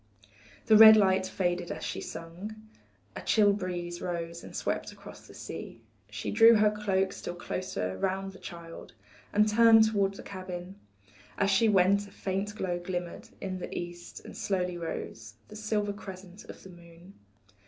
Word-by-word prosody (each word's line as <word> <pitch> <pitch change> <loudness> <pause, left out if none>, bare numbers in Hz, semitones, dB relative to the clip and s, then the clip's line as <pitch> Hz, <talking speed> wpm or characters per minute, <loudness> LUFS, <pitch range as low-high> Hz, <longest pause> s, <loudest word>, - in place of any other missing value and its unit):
The 220 - +5
red 220 0 +10
light 190 -2 +3
faded 175 -2 -2
as - - -6
she - - -4
sung, 170 +6 -8 0.6
A - - -6
chill 205 -2 +4
breeze 175 -3 -4
rose 170 -1 -4
and - - -11
swept - - -2
across - - -13
the - - -14
sea, 115 - -8 0.3
She 105 0 -5
drew 225 +2 +7
her 210 0 +4
cloak 195 -2 0
still 175 - -6
closer 175 - -4
round 195 0 -2
the 190 - -14
child, 170 -1 -10 0.4
And 210 +1 +4
turned 225 +1 +7
toward 200 -2 +1
the - - -10
cabin; 185 0 -7 0.6
As 200 0 +2
she 220 +3 +4
went 200 +1 +3
a - - -16
faint 195 +2 -3
glow 180 -4 -2
glimmered 175 -1 -5
In 185 -1 -4
the - - -7
east, 175 0 -8
and - - -10
slowly 180 -2 -1
rose 115 -10 -6
The 210 - -11
silver 210 -1 -1
crescent 190 -1 -11
of - - -12
the 190 - -12
moon. 170 +2 -16
190 Hz, 165 wpm, -29 LUFS, 175-205 Hz, 0.6 s, red